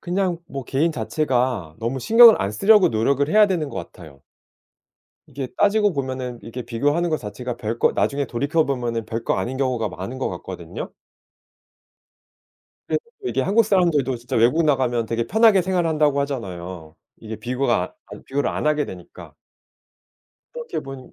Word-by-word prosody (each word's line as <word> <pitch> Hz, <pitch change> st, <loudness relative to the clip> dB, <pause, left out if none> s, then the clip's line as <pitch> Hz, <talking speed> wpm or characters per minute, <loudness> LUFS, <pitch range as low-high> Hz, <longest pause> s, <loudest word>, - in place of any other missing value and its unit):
그냥 180 Hz, -1 st, -1 dB
뭐 135 Hz, -3 st, -6 dB
개인 155 Hz, +7 st, 0 dB
자체가 125 Hz, -, -1 dB
너무 120 Hz, +4 st, -2 dB
신경을 230 Hz, -, +7 dB
안 100 Hz, +2 st, -2 dB
쓰려고 205 Hz, -, +5 dB
노력을 135 Hz, +6 st, +1 dB
해야 210 Hz, +3 st, +6 dB
되는 165 Hz, -6 st, -1 dB
것 -, -, -8 dB, 0.2 s
같아요. 75 Hz, -6 st, -14 dB, 1.1 s
이게 135 Hz, -1 st, -6 dB
따지고 205 Hz, -1 st, +3 dB
보면은 130 Hz, -3 st, -4 dB
이렇게 120 Hz, +2 st, -7 dB
비교하는 145 Hz, +9 st, 0 dB
것 155 Hz, -, +1 dB
자체가 120 Hz, +2 st, -6 dB
별거 115 Hz, 0 st, 0 dB
나중에 140 Hz, 0 st, 0 dB
돌이켜 145 Hz, +7 st, 0 dB
보면은 120 Hz, -5 st, -2 dB
별거 115 Hz, 0 st, -2 dB
아닌 130 Hz, +2 st, -3 dB
경우가 125 Hz, -5 st, -1 dB
많은 100 Hz, +10 st, -7 dB
것 -, -, -1 dB
같거든요. -, -, -7 dB, 2.0 s
그래서 -, -, 0 dB, 0.2 s
또 380 Hz, -, -3 dB
이게 -, -, -1 dB
한국 215 Hz, +4 st, +3 dB
사람들도 165 Hz, -, +2 dB
진짜 120 Hz, 0 st, -5 dB
외국 125 Hz, +9 st, +3 dB
나가면 125 Hz, -6 st, +1 dB
되게 115 Hz, 0 st, -2 dB
편하게 220 Hz, -3 st, +4 dB
생활한다고 160 Hz, -6 st, +1 dB
하잖아요. 90 Hz, -, -6 dB, 0.2 s
이게 110 Hz, -1 st, -8 dB
비교가 120 Hz, -7 st, -1 dB, 0.2 s
아니 -, -, -10 dB
비교를 140 Hz, +2 st, -1 dB
안 -, -, -3 dB
하게 150 Hz, -1 st, +2 dB
되니까. 90 Hz, -2 st, -11 dB, 1.2 s
그렇게 475 Hz, -4 st, -5 dB
본 135 Hz, -1 st, -10 dB
135 Hz, 355 characters per minute, -22 LUFS, 115-165 Hz, 2.0 s, 신경을